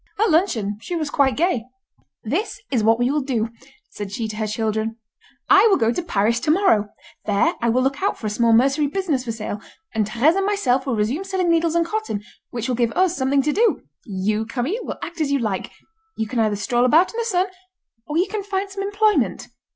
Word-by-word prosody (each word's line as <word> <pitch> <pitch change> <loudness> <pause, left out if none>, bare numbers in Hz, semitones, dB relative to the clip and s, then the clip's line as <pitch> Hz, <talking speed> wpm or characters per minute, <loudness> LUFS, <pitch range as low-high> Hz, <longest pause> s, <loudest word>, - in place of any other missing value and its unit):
At 435 -3 +3
luncheon 225 - +1
she 345 +10 -4
was 310 -4 -2
quite 270 -2 +2
gay. 320 -9 +1 0.6
"This 330 - -2
is 240 -5 +1
what 225 +1 +4
we 245 +2 +1
will 300 +1 +1
do," 240 -5 -1 0.4
said 205 -2 -6
she 220 +2 -3
to 215 - -6
her 215 -1 -1
children. 220 +1 -2 0.5
"I 400 +3 +7
will 395 - +4
go 230 -2 +2
to 245 - -2
Paris 230 - +1
to 260 - -3
morrow. 300 - +3 0.4
There 210 - +2
I 235 - +2
will 255 +3 +2
look 270 +1 -1
out 400 - 0
for - - -9
a - - 0
small 230 +2 +2
mercery 275 +6 +3
business 305 -5 -1
for 230 - -2
sale, 215 -2 -5 0.3
and 215 -2 0
Thérèse 265 - +3
and 390 - +1
myself 270 -11 +1
will 255 - 0
resume 225 - -1
selling 375 -3 0
needles 335 0 +2
and 340 0 +3
cotton, 430 - -3 0.3
which 235 0 -4
will 255 - 0
give 235 -1 +1
us 365 -1 +2
something 270 -1 +1
to 300 +1 +1
do. 455 +3 +2 0.2
You, 210 +2 -2
Camille, 270 - -2
will - - -5
act 340 -1 -6
as 290 -2 0
you 280 - +3
like. 215 -7 -2 0.5
You 220 - -1
can 245 +1 -2
either 215 -2 +2
stroll 240 +4 0
about 315 - +4
in 460 - -4
the - - +1
sun, 375 -5 +1 0.6
or 300 +1 -2
you 360 +3 +2
can 425 +1 -3
find 390 0 -3
some 395 0 -5
employment." 410 +2 +1
265 Hz, 225 wpm, -22 LUFS, 225-360 Hz, 0.6 s, I